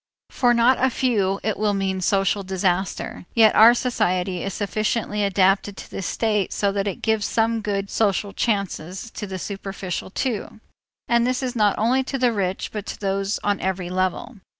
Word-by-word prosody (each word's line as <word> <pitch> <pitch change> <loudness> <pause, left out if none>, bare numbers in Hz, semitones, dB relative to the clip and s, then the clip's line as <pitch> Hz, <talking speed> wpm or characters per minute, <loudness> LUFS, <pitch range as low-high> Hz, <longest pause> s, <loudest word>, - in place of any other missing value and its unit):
For 245 -3 +3
not 245 +2 +3
a 260 - +5
few 205 -7 0
it 215 - -1
will 210 -1 +1
mean 190 -1 -1
social 195 +2 +1
disaster. 185 -1 -2
Yet 220 -2 +6
our 230 +3 +8
society 185 -7 0
is 195 - -3
sufficiently 210 +1 -1
adapted 195 0 +2
to - - -10
this 190 - -4
state 210 -4 0
so 200 -1 0
that 200 0 -1
it 195 - -4
gives 220 -2 +1
some 225 0 +1
good 200 -2 -2
social 200 -1 0
chances 200 -2 -2
to 210 - -6
the 190 -1 -5
superficial 195 -2 -5
too, 220 0 -3 0.5
and 235 0 +3
this 255 0 -1
not 210 -3 +2
only 250 +5 +2
to 270 - -3
the 250 -2 +2
rich, 190 -3 -2
but 210 -2 -5
to - - -6
those 195 0 -1
on 205 -1 +1
every 185 -1 -2
level. 185 +6 -2
205 Hz, 175 wpm, -23 LUFS, 190-225 Hz, 0.5 s, our